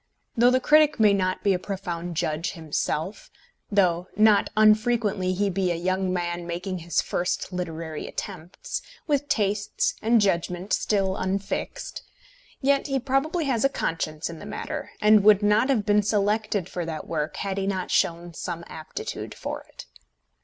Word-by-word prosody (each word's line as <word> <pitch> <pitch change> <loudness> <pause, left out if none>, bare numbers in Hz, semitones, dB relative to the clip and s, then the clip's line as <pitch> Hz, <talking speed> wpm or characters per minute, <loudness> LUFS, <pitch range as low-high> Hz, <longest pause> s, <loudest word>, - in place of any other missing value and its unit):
Though 240 +1 +5
the 255 +1 +3
critic 300 +1 +4
may 210 -2 +6
not 185 -1 0
be 200 - +4
a 180 - -1
profound 175 -3 -5
judge 155 +3 -1
himself; 160 +2 -3 0.4
though 180 -3 +2
not 215 -1 +5
unfrequently 215 -3 +3
he 200 +2 +1
be 185 0 0
a - - 0
young 185 +2 0
man 175 -1 -2
making 180 +2 -4
his 170 +1 0
first 180 +1 -2
literary 165 -3 -4
attempts, 180 -3 -6 0.2
with 290 -1 0
tastes 205 -1 0
and 230 +1 +4
judgment 180 -1 0
still 195 -2 +1
unfixed, 195 +1 -3 0.6
yet 275 +1 +2
he 275 -1 0
probably 275 +6 0
has 250 -5 +1
a 275 - +4
conscience 155 - -2
in 165 -1 -8
the - - -9
matter, 210 - -5
and 210 -1 +6
would 210 -1 +6
not 210 +5 +3
have 225 -7 +2
been 210 -1 +4
selected 210 -2 0
for 180 - -4
that 160 -2 -5
work 155 -2 -3
had 195 0 -2
he 195 - -1
not 190 -2 -2
shown 170 0 +1
some 170 0 -5
aptitude 155 -1 -6
for - - -5
it. - - -11
195 Hz, 160 wpm, -25 LUFS, 175-215 Hz, 0.6 s, may